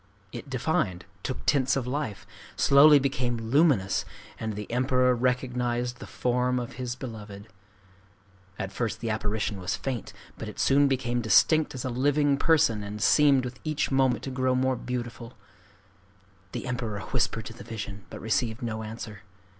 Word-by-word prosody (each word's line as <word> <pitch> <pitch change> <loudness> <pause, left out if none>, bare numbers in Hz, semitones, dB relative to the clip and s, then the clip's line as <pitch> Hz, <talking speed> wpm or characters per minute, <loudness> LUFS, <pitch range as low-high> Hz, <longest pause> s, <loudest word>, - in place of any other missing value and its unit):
It 145 - -8
defined, 115 - -1 0.2
took 130 - -5
tints 130 -3 +3
of 135 -3 -1
life, 125 -6 -3 0.3
slowly 145 +2 +7
became 130 -3 0
luminous, 115 - +2 0.4
and 110 -2 -3
the 105 0 -5
Emperor 125 +1 +3
recognized 125 -1 -1
the - - -9
form 125 0 0
of 125 +2 -6
his 120 -1 -3
beloved 105 -5 -8 1.1
At 95 - -4
first 115 +2 -2
the 115 -1 -2
apparition 105 -1 -2
was 90 +1 -1
faint; 130 -5 -4 0.3
but - - -5
it - - -11
soon 140 +1 +4
became 125 -2 0
distinct 155 +7 +4
as 130 - -5
a 130 - -2
living 145 +3 +2
person, 140 -10 +3
and 105 +1 -6
seemed 140 +2 +4
with 125 +1 -7
each 155 -2 -1
moment 135 -2 +2
to 135 - -4
grow 130 0 +1
more 130 0 +2
beautiful. 120 -1 -5 1.2
The - - -4
Emperor 120 -5 -3
whispered 110 0 -1
to 115 - -7
the 120 - -11
vision, 105 -3 -7
but - - -8
received 115 +2 -1
no 110 -2 -3
answer. 110 -1 -7
125 Hz, 160 wpm, -27 LUFS, 110-130 Hz, 1.2 s, slowly